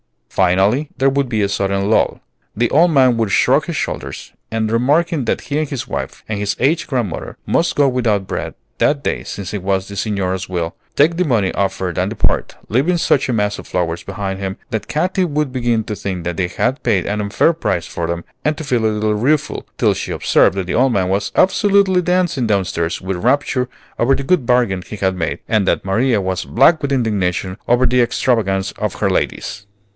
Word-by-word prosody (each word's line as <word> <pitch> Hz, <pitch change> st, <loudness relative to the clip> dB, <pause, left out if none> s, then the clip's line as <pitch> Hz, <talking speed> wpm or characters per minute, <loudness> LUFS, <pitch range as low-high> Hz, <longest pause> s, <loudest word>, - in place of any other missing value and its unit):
Finally, 95 Hz, +10 st, +2 dB
there 135 Hz, +1 st, +3 dB
would 135 Hz, -1 st, 0 dB
be 110 Hz, -3 st, 0 dB
a 100 Hz, -, 0 dB
sudden 100 Hz, 0 st, 0 dB
lull. 110 Hz, -, +2 dB, 0.3 s
The 120 Hz, +2 st, +1 dB
old 165 Hz, +5 st, +5 dB
man 130 Hz, -6 st, +4 dB
would 110 Hz, -3 st, 0 dB
shrug -, -, +3 dB
his -, -, -4 dB
shoulders, -, -, -4 dB, 0.2 s
and 110 Hz, -1 st, -1 dB
remarking 145 Hz, +5 st, +2 dB
that -, -, 0 dB
he 145 Hz, +3 st, -2 dB
and 155 Hz, -2 st, -2 dB
his 135 Hz, -5 st, -4 dB
wife -, -, -5 dB
and 105 Hz, -2 st, -3 dB
his 105 Hz, 0 st, -1 dB
aged 155 Hz, +6 st, +1 dB
grandmother 120 Hz, -, -3 dB
must 170 Hz, -, +1 dB
go 145 Hz, -1 st, +4 dB
without 115 Hz, -6 st, +1 dB
bread -, -, -4 dB, 0.2 s
that 145 Hz, -1 st, +2 dB
day -, -, -1 dB
since 100 Hz, -1 st, -6 dB
it 105 Hz, -, -3 dB
was 95 Hz, 0 st, -1 dB
the 100 Hz, -, -8 dB
Signora's 95 Hz, -2 st, -2 dB
will, 85 Hz, -2 st, -2 dB, 0.2 s
take 165 Hz, +4 st, +3 dB
the 180 Hz, -, +2 dB
money 110 Hz, -, +1 dB
offered 95 Hz, -3 st, -1 dB
and 95 Hz, +2 st, 0 dB
depart, 110 Hz, -, 0 dB
leaving 140 Hz, -, +2 dB
such 145 Hz, -5 st, +2 dB
a -, -, +1 dB
mass 105 Hz, -2 st, 0 dB
of -, -, -10 dB
flowers 85 Hz, -2 st, -1 dB
behind 95 Hz, -1 st, -4 dB
him 95 Hz, 0 st, -4 dB
that 110 Hz, -, -3 dB
Katy 185 Hz, +4 st, 0 dB
would 150 Hz, -4 st, -1 dB
begin 120 Hz, -3 st, 0 dB
to 105 Hz, -, -5 dB
think 95 Hz, -3 st, -4 dB
that 85 Hz, 0 st, -3 dB
they 95 Hz, -2 st, +1 dB
had 120 Hz, +9 st, -1 dB
paid 95 Hz, -3 st, +1 dB
an 105 Hz, +1 st, -1 dB
unfair 105 Hz, +11 st, +2 dB
price 90 Hz, -, -1 dB
for 85 Hz, -, -4 dB
them 85 Hz, 0 st, -3 dB, 0.2 s
and 150 Hz, 0 st, 0 dB
to -, -, -5 dB
feel 125 Hz, -6 st, 0 dB
a -, -, +5 dB
little 105 Hz, 0 st, 0 dB
rueful, 135 Hz, +8 st, 0 dB
till -, -, +3 dB
she -, -, -5 dB
observed -, -, +3 dB
that 95 Hz, -2 st, -2 dB
the 90 Hz, -, -3 dB
old 130 Hz, 0 st, +3 dB
man 95 Hz, -3 st, +1 dB
was 100 Hz, +1 st, -1 dB
absolutely 195 Hz, -1 st, +3 dB
dancing 180 Hz, -8 st, +1 dB
downstairs 95 Hz, -4 st, -1 dB
with 95 Hz, 0 st, -3 dB
rapture 130 Hz, 0 st, +1 dB, 0.3 s
over 135 Hz, +3 st, +3 dB
the 140 Hz, -, -4 dB
good 145 Hz, -4 st, +1 dB
bargain 120 Hz, -7 st, +2 dB
he 105 Hz, -, -8 dB
had 95 Hz, -2 st, 0 dB
made, 80 Hz, -3 st, -2 dB
and 105 Hz, -4 st, +1 dB
that -, -, +1 dB
Maria 110 Hz, +4 st, +2 dB
was 95 Hz, 0 st, -2 dB
black 155 Hz, +7 st, +4 dB
with 140 Hz, -, -2 dB
indignation 100 Hz, -6 st, -1 dB
over 120 Hz, +2 st, +3 dB
the 125 Hz, +1 st, +3 dB
extravagance 110 Hz, -5 st, +1 dB
of -, -, -2 dB
her -, -, 0 dB
ladies! 100 Hz, -, -2 dB
110 Hz, 210 wpm, -18 LUFS, 95-135 Hz, 0.3 s, old